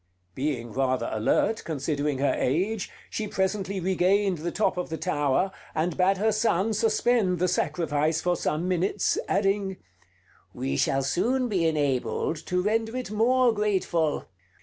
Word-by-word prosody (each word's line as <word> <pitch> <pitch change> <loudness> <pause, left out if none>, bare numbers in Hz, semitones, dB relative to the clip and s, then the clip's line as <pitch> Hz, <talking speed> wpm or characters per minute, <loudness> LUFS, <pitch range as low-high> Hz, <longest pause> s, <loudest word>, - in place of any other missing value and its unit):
Being 130 -3 -3
rather 130 -2 0
alert, 110 - +1
considering 145 -2 -2
her 140 +1 +2
age, 190 +9 0 0.2
she 215 - -3
presently 195 0 -1
regained 190 0 +2
the 170 +2 -3
top 215 - +1
of 180 - -3
the 160 - -3
tower, 155 +1 0 0.2
and 160 +2 0
bade 190 +1 +3
her 220 +3 +2
son 215 -1 +1
suspend 220 -3 +2
the 180 +2 +1
sacrifice 160 -3 0
for 180 0 +1
some 165 +1 -1
minutes, 185 +2 +1
adding: 195 -1 0 0.8
"We 70 +1 -2
shall 135 - +1
soon 240 - 0
be 180 -6 +1
enabled 145 0 0
to 180 0 0
render 225 +3 0
it 250 -5 -5
more 240 +3 +3
grateful. 190 -7 0
180 Hz, 145 wpm, -26 LUFS, 155-210 Hz, 0.8 s, bade